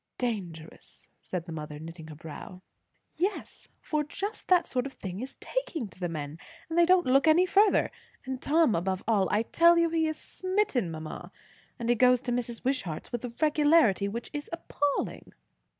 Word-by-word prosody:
"Dangerous!" 180 Hz, -10 st, -5 dB
said 180 Hz, -3 st, -4 dB
the 170 Hz, -, -8 dB
mother, 150 Hz, -2 st, -6 dB
knitting 160 Hz, +1 st, -9 dB
her 155 Hz, -, -9 dB
brows. 165 Hz, +4 st, -9 dB, 0.5 s
"Yes; 390 Hz, +4 st, -3 dB
for 305 Hz, -1 st, -1 dB
just 400 Hz, +8 st, -5 dB
that 355 Hz, -2 st, +5 dB
sort 250 Hz, 0 st, -2 dB
of 270 Hz, -, -11 dB
thing 190 Hz, -1 st, -6 dB
is 265 Hz, +2 st, -7 dB
taking -, -, -3 dB
to 185 Hz, -, -17 dB
the 175 Hz, -1 st, -2 dB
men; 155 Hz, -1 st, -5 dB, 0.3 s
and 325 Hz, -, -4 dB
they 340 Hz, 0 st, +5 dB
don't 365 Hz, -1 st, +5 dB
look 270 Hz, +4 st, +4 dB
any 330 Hz, +4 st, +6 dB
further. 400 Hz, +2 st, +4 dB, 0.3 s
And 260 Hz, 0 st, -4 dB
Tom 310 Hz, -4 st, +3 dB
above 185 Hz, +2 st, -1 dB
all. 205 Hz, -4 st, +3 dB
I 210 Hz, +2 st, +2 dB
tell 340 Hz, +7 st, +5 dB
you, 335 Hz, -1 st, +3 dB
he 325 Hz, -1 st, +2 dB
is 315 Hz, 0 st, -2 dB
smitten, 370 Hz, -, -1 dB
mamma. 155 Hz, -1 st, -7 dB, 0.5 s
And 235 Hz, -3 st, -4 dB
he -, -, +6 dB
goes 250 Hz, +1 st, +4 dB
to 245 Hz, -, -2 dB
Mrs. 240 Hz, -1 st, -3 dB
Wishart's 250 Hz, -, -2 dB
with 240 Hz, 0 st, -3 dB
a 240 Hz, -, -6 dB
regularity 300 Hz, -, +4 dB
which 230 Hz, +4 st, -5 dB
is 290 Hz, 0 st, -5 dB
appalling." 290 Hz, -3 st, -2 dB
250 Hz, 180 wpm, -29 LUFS, -, 0.5 s, any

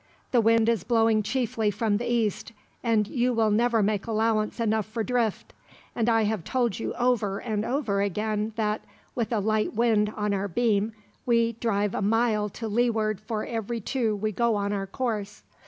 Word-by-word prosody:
The 245 Hz, -, +4 dB
wind 225 Hz, 0 st, +4 dB
is 230 Hz, -6 st, +1 dB
blowing 225 Hz, -2 st, +3 dB
chiefly 225 Hz, -1 st, 0 dB
from 205 Hz, 0 st, 0 dB
the 240 Hz, +2 st, -3 dB
east, 220 Hz, -1 st, -1 dB, 0.3 s
and 225 Hz, -3 st, +2 dB
you 245 Hz, +1 st, 0 dB
will 225 Hz, -2 st, +2 dB
never 230 Hz, 0 st, +3 dB
make 205 Hz, +1 st, 0 dB
allowance 220 Hz, 0 st, 0 dB
enough 220 Hz, -2 st, +1 dB
for 220 Hz, +1 st, -3 dB
drift; 235 Hz, -3 st, -1 dB, 0.4 s
and 230 Hz, 0 st, +1 dB
I 225 Hz, -1 st, +3 dB
have 210 Hz, -4 st, -1 dB
told 240 Hz, -3 st, 0 dB
you -, -, -3 dB
over 235 Hz, -6 st, +1 dB
and 215 Hz, -2 st, -2 dB
over 225 Hz, -6 st, 0 dB
again 210 Hz, +2 st, -1 dB
that, 215 Hz, -1 st, -1 dB, 0.3 s
with 235 Hz, -2 st, -2 dB
a 225 Hz, -, +1 dB
light 215 Hz, +2 st, 0 dB
wind 215 Hz, -2 st, +2 dB
on 210 Hz, -1 st, 0 dB
our 200 Hz, 0 st, -1 dB
beam, 215 Hz, +1 st, +1 dB, 0.3 s
we 230 Hz, -1 st, +3 dB
drive 210 Hz, -3 st, -1 dB
a -, -, -2 dB
mile 215 Hz, 0 st, +1 dB
to 225 Hz, +3 st, -6 dB
leeward 220 Hz, -2 st, 0 dB
for 215 Hz, 0 st, -3 dB
every 230 Hz, 0 st, -3 dB
two 225 Hz, 0 st, -1 dB
we 215 Hz, +1 st, -2 dB
go 235 Hz, +2 st, +1 dB
on 200 Hz, 0 st, -1 dB
our 195 Hz, -1 st, -2 dB
course. 210 Hz, -2 st, -3 dB
220 Hz, 185 wpm, -26 LUFS, 210-230 Hz, 0.4 s, The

